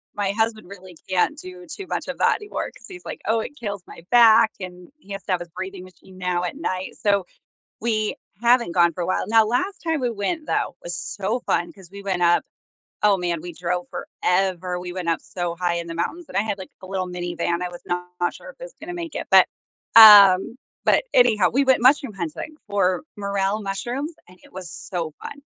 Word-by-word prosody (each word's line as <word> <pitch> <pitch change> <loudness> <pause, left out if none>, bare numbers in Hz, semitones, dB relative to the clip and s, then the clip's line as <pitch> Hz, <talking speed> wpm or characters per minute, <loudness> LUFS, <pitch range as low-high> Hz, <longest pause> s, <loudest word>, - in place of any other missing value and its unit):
my 200 -1 0
husband 220 -2 -1
really 185 -3 -12
can't 185 +11 +1
do 365 +2 -10
too 395 +4 -7
much - - -3
of - - -5
that - - +3
anymore 415 -1 -5
'cause - - -15
he's 365 -2 -11
like, - - -7
"Oh, 225 +2 +2
it 290 +6 -6
kills 205 -4 -5
my 165 - -13
back," 230 -2 +7
and 180 +3 -9
he 205 -9 -16
has 195 - -6
to 195 - -3
have 180 - 0
his 175 - -8
breathing 190 +2 -7
machine 185 0 -16
now 180 -1 -1
at 180 - -3
night, 185 - -3
so, 200 -3 +1 0.6
we 215 -2 0 0.3
haven't 235 -5 +4
gone 170 -1 +4
for 180 - -7
a 170 - -1
while, 185 - 0
now 225 0 +5
last 370 - -1
time 320 -3 -1
we 245 -2 0
went, 270 - -3
though, - - -1
was 175 0 -5
so 205 +5 -3
fun, 175 - -1
'cause 190 -4 -16
we 200 0 -10
went 185 -3 -1
up 175 0 +4 0.6
Oh, 205 -2 +5
man, 175 -2 -2
we 175 -1 -7
drove 175 +1 -3
forever, 180 -1 -1
we 180 0 -6
went 180 -2 -4
up 165 - +1
so 175 -2 -4
high 175 0 -1
in 170 0 -3
the 165 - -6
mountains, 340 - -3
and - - -7
I - - +4
had, 215 -2 -2
like, 190 - -9
a - - -9
little 185 -1 -2
minivan. 175 -1 -2
I 180 - -2
was 175 0 -11
not 180 0 -3
sure - - -12
if - - -18
it - - -6
was - - -11
gonna 350 +2 -7
make 335 -2 -6
it, - - -4
but, - - +8 0.5
um, 205 -1 +9 0.3
but - - +3
anyhow, 215 - +4
we 270 +4 +2
went 260 -3 +3
mushroom 260 -4 +4
hunting 180 - -6
for 190 -3 +1
morel 200 0 -1
mushrooms, 245 +10 -4
and 180 0 -18
it - - -18
was 185 -2 -8
so 170 -5 -5
fun. 285 - -8
195 Hz, 225 wpm, -23 LUFS, 180-230 Hz, 0.6 s, um